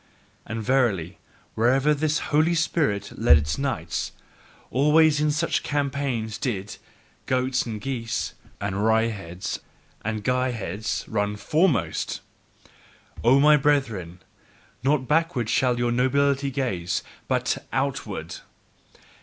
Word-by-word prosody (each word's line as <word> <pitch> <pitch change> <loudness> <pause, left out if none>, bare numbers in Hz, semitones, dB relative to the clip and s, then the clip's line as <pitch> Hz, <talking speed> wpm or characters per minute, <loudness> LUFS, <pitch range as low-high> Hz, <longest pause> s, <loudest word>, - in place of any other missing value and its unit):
And 110 0 -4
verily, 110 -10 +1 0.3
wherever 130 +6 +3
this 150 +1 0 0.2
"Holy 160 +3 +4
Spirit" 145 -11 0
led 110 -9 +7
its 75 - -2
knights, 120 - -2 0.6
always 150 +3 +4
in 150 - +2
such 155 +3 0
campaigns 140 -6 -2
did 105 -6 -3 0.5
goats 130 -1 +1
and 110 -2 -4
geese, 120 -2 -3 0.3
and 100 -1 -2
wryheads 110 -6 0 0.4
and 110 0 -3
guyheads 115 -5 -1
run 105 -1 -1
FOREMOST! 155 - +1 1.0
O 125 +4 +6
my 150 +1 +6
brethren, 115 - 0 0.6
not 135 -1 +1
backward 150 -7 +1
shall 125 -2 +2
your 120 0 +1
nobility 140 +3 +2
gaze, 95 -11 -2 0.2
but - - 0
OUTWARD! 110 - -3
125 Hz, 105 wpm, -25 LUFS, 105-140 Hz, 1.0 s, led